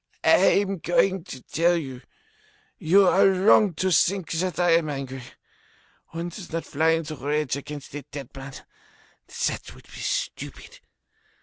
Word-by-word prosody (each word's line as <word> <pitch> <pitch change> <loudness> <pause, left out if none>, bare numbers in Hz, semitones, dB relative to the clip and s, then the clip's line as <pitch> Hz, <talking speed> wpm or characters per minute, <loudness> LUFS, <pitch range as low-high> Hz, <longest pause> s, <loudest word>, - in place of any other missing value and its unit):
I - - +5
am 195 -2 -4
going 180 +2 +1
to 130 -2 -9
tell 170 +2 +1
you. 130 -6 -6 0.8
You 190 +3 +4
are 190 - +5
wrong 190 0 +4
to 185 +4 0
think 185 0 +2
that 180 0 -2
I 175 -1 +3
am 165 -2 +3
angry. 135 -2 -5 0.9
One 170 +1 -5
does 175 +2 -10
not 165 0 -3
fly 160 +3 +2
into 165 -1 -2
a - - -9
rage 145 -1 -1
against 145 0 -8
a 145 - -5
dead 140 -2 -10
man. 135 0 -9 0.7
That - - -3
would - - -17
be - - -12
stupid. - - -4
165 Hz, 160 wpm, -25 LUFS, 145-185 Hz, 0.9 s, I